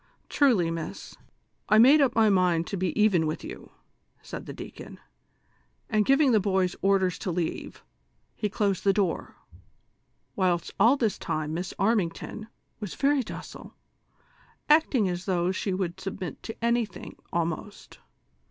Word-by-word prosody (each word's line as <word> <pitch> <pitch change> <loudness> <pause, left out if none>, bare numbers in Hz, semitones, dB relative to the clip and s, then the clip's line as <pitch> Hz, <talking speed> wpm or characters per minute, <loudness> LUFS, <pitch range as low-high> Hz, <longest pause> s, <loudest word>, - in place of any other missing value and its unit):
" - - -41
Trulj, 210 - +3
miss, 165 -1 -7 0.5
I 215 - +5
made 270 +7 +7
up 260 -3 +2
my 225 -1 +5
mind 180 -4 +2
to 200 - -4
be 185 +1 -2
even 190 -7 +3
with 155 - -4
you," 335 +5 -9 0.5
said - - -8
the - - -5
deacon, - - -10 0.9
and 215 -1 +2
giving 275 0 +4
the 220 - +5
boys 190 -2 0
orders 195 -2 +2
to - - -4
leave, 170 -2 -4 0.5
he 210 - -2
closed 200 -2 -1
the 195 - +4
door, 195 -5 -1 1.0
whilst 180 -3 0
all 255 +5 +5
this 225 -6 0
time 155 0 -3
Miss 180 +3 -3
Armington 210 0 -1 0.3
was 205 -5 -6
very 280 0 +2
docile, - - -9 0.9
acting 295 -8 +4
as 180 0 -3
though 180 -2 +1
she 195 +1 -2
would 185 -2 -3
submit 185 -5 -6
to 225 +1 -6
anything 235 -5 -1 0.2
almost. 170 +4 -4
195 Hz, 145 wpm, -27 LUFS, 175-225 Hz, 1.0 s, made